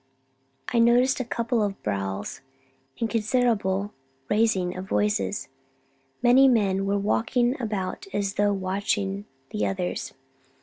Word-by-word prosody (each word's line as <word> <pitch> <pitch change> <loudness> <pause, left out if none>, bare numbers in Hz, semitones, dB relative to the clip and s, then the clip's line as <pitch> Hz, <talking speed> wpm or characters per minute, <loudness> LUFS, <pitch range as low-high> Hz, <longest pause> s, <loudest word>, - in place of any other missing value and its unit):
I 235 - +3
noticed 245 +3 +4
a - - 0
couple 235 0 -1
of 200 -2 -1
brawls, 100 +4 -3 0.6
and 230 - +1
considerable 210 -3 0 0.4
raising 205 -5 +2
of 185 +1 -7
voices; 105 -2 0 0.8
many 255 +3 +7
men 195 -6 +2
were 200 +1 +1
walking 240 +5 +1
about 215 - -3
as 200 -1 -1
though 205 0 +2
watching 195 +1 -1 0.3
the 210 - 0
others. 185 -2 -3
205 Hz, 120 wpm, -25 LUFS, 190-235 Hz, 0.8 s, many